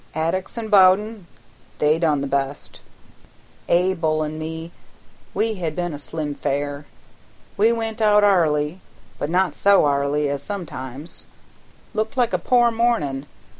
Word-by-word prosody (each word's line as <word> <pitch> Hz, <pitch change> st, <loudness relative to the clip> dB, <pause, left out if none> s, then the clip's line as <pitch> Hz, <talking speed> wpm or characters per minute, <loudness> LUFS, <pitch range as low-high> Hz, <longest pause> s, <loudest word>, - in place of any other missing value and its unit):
"Addicks 165 Hz, +7 st, -2 dB
an' 225 Hz, -2 st, -4 dB
Bowden 200 Hz, 0 st, +4 dB, 0.5 s
they 150 Hz, +2 st, +2 dB
done 155 Hz, -4 st, +1 dB
the -, -, -2 dB
best; 140 Hz, +1 st, -3 dB, 0.9 s
Abel 170 Hz, -3 st, +2 dB
an' 155 Hz, +1 st, -5 dB
me 160 Hz, +1 st, -6 dB, 0.6 s
we 225 Hz, 0 st, +1 dB
had 170 Hz, -6 st, -4 dB
but 175 Hz, -1 st, -2 dB
a 145 Hz, -, -6 dB
slim 150 Hz, 0 st, -4 dB
fare. 145 Hz, +1 st, -3 dB, 0.7 s
We 215 Hz, +3 st, +4 dB
went 225 Hz, -1 st, -3 dB
out 210 Hz, -1 st, +5 dB
'arly, 165 Hz, -3 st, +2 dB, 0.4 s
but 145 Hz, -, -2 dB
not 185 Hz, +2 st, +1 dB
so 200 Hz, -5 st, +4 dB
'arly 145 Hz, +1 st, +1 dB
as 140 Hz, -1 st, -2 dB
sometimes; 145 Hz, -6 st, -7 dB, 0.7 s
looked 220 Hz, +4 st, -2 dB
like 240 Hz, -5 st, +2 dB
a 180 Hz, -, +1 dB
poor 240 Hz, +5 st, +3 dB
mornin'. 150 Hz, -, 0 dB
165 Hz, 135 wpm, -22 LUFS, 145-205 Hz, 0.9 s, out